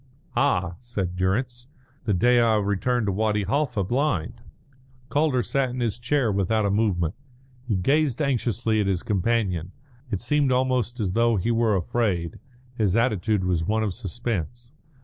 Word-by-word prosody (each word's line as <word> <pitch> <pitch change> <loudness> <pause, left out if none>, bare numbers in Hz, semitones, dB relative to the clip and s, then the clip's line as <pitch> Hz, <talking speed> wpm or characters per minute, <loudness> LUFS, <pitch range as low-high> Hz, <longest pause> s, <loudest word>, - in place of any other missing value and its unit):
"Ah," 90 -11 +1
said 100 -7 -4
Durrance, 120 +7 -1 0.4
"the 105 - +1
day 120 +7 +4
I 115 -2 +4
returned 105 +4 0
to 100 - 0
Wadi 105 +1 0
Halfa 125 -1 0
blind." 120 - -1 0.7
Calder 145 -4 +2
sat 135 +1 0
in 125 +1 -5
his 120 -1 -1
chair 120 -1 +1
without 100 +2 +1
a 100 - +1
movement. 95 -6 +1 0.5
He 110 - +1
gazed 135 - +1
anxiously 120 -5 0
at 100 - -1
his 95 -3 0
companion, 95 -4 0 0.4
it 100 -5 -2
seemed 140 +3 +1
almost 125 -2 0
as 95 -4 -1
though 115 +1 +3
he 105 +4 0
were 115 -2 +2
afraid; 90 -3 -1 0.4
his 105 -5 +1
attitude 110 -4 +1
was 90 -3 0
one 110 +5 0
of 105 -4 -1
suspense. 120 - -4
110 Hz, 155 wpm, -25 LUFS, 95-125 Hz, 0.7 s, day